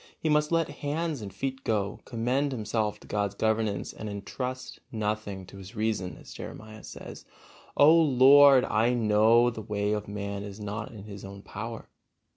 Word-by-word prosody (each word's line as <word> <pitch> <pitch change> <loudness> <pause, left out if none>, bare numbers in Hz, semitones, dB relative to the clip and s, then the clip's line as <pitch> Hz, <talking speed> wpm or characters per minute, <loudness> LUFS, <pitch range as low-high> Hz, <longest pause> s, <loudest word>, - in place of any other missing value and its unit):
He 160 - -1
must 150 +1 +2
let 165 -1 +2
hands 150 -1 -2
and 100 -2 -6
feet 135 +3 -4
go, 105 -3 -1
commend 130 +4 0
himself 110 -2 -2
to - - -15
God's 100 -1 -1
governance, 110 -1 0
and 110 - -6
entrust 125 +6 -5
nothing 105 -3 -3
to 95 - -13
his 95 -1 -11
reason, 105 -4 -2
as - - -12
Jeremiah 110 0 -9
says, - - -9 0.5
"O 150 +3 +8
Lord, 140 -3 +7
I 115 +3 +2
know 115 +2 +4
that - - -11
the 110 - -6
way 105 -1 -1
of 105 -1 -2
man 100 -1 -4
is 100 0 -8
not 105 +4 -5
in 105 -4 -10
his 100 -2 -9
own 100 0 -9
power." 115 +2 -7
110 Hz, 175 wpm, -28 LUFS, 105-130 Hz, 0.5 s, O